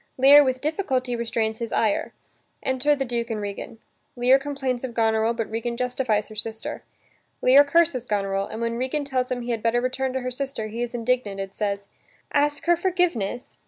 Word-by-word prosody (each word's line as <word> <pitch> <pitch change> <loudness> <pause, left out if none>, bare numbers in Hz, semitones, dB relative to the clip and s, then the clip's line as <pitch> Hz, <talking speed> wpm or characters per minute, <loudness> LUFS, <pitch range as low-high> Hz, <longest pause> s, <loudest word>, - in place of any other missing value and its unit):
Lear 280 +3 +8
with 260 -1 -1
difficulty 265 -6 -1
restrains 225 -1 -1
his 230 -1 -4
ire. 215 -3 +1 0.5
Enter 265 +3 +2
the 270 -1 -2
Duke 235 -1 -2
and 220 -2 -2
Regan. 205 +2 -6 0.4
Lear 250 +2 +4
complains 270 -3 -3
of 245 -3 -5
Goneril 225 0 +2
but 225 -2 -2
Regan 230 +2 -3
justifies 250 -4 0
her 215 - -11
sister. 220 +1 -1 0.6
Lear 270 +3 +8
curses 285 -5 +2
Goneril, 195 -1 -1
and, 220 - -7
when 230 0 -1
Regan 265 +4 -2
tells 255 -2 -1
him 250 -1 -2
he 240 0 -3
had 230 -2 -2
better 230 +2 +2
return 260 +1 -1
to 260 - -2
her 255 0 -3
sister, 270 -3 -3
he 230 +3 -5
is 240 0 -3
indignant 230 -4 -1
and 195 0 -5
says: 200 -1 -2 0.5
"Ask 290 0 +1
her 345 0 +5
forgiveness?" 335 - -1
245 Hz, 190 wpm, -24 LUFS, 225-265 Hz, 0.6 s, Lear